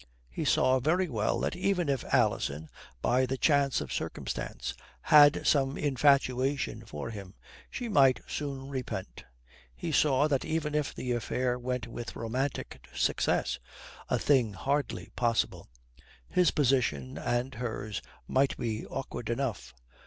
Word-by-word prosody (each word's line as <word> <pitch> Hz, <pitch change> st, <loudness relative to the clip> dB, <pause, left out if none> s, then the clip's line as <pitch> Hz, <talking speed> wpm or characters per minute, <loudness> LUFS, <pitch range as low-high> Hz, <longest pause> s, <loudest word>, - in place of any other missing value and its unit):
He -, -, -3 dB
saw 130 Hz, 0 st, +4 dB
very 175 Hz, +8 st, +2 dB
well 110 Hz, -8 st, 0 dB
that -, -, -1 dB
even 180 Hz, -2 st, 0 dB
if 135 Hz, -2 st, 0 dB
Alison, 105 Hz, -, +1 dB, 0.3 s
by 130 Hz, +1 st, +3 dB
the 135 Hz, +2 st, -2 dB
chance 140 Hz, -2 st, +3 dB
of -, -, -5 dB
circumstance, -, -, -4 dB, 0.3 s
had 145 Hz, -1 st, +6 dB
some 135 Hz, -1 st, +2 dB
infatuation 135 Hz, -4 st, +2 dB
for 115 Hz, -, -5 dB
him, 100 Hz, -3 st, -9 dB, 0.3 s
she 245 Hz, -, -4 dB
might 135 Hz, -, +5 dB
soon 135 Hz, -2 st, -4 dB
repent: 130 Hz, -, -5 dB, 0.5 s
he -, -, -4 dB
saw 145 Hz, 0 st, +3 dB
that 140 Hz, -3 st, 0 dB
even 155 Hz, -2 st, -2 dB
if 150 Hz, -2 st, -1 dB
the 125 Hz, -, -3 dB
affair 125 Hz, +1 st, -1 dB
went 125 Hz, -2 st, -2 dB
with 120 Hz, 0 st, -7 dB
romantic 125 Hz, +4 st, -3 dB
success 60 Hz, -, +1 dB, 0.5 s
a -, -, +2 dB
thing 125 Hz, -7 st, +2 dB
hardly 140 Hz, +7 st, -2 dB
possible 115 Hz, -, 0 dB, 0.6 s
his 180 Hz, -2 st, +3 dB
position 120 Hz, -, +1 dB
and 120 Hz, +2 st, -1 dB
hers 110 Hz, -3 st, -4 dB, 0.3 s
might 135 Hz, +1 st, +2 dB
be 110 Hz, -2 st, -2 dB
awkward 120 Hz, -3 st, -5 dB
enough. 115 Hz, -, -2 dB
130 Hz, 135 wpm, -30 LUFS, 115-140 Hz, 0.6 s, had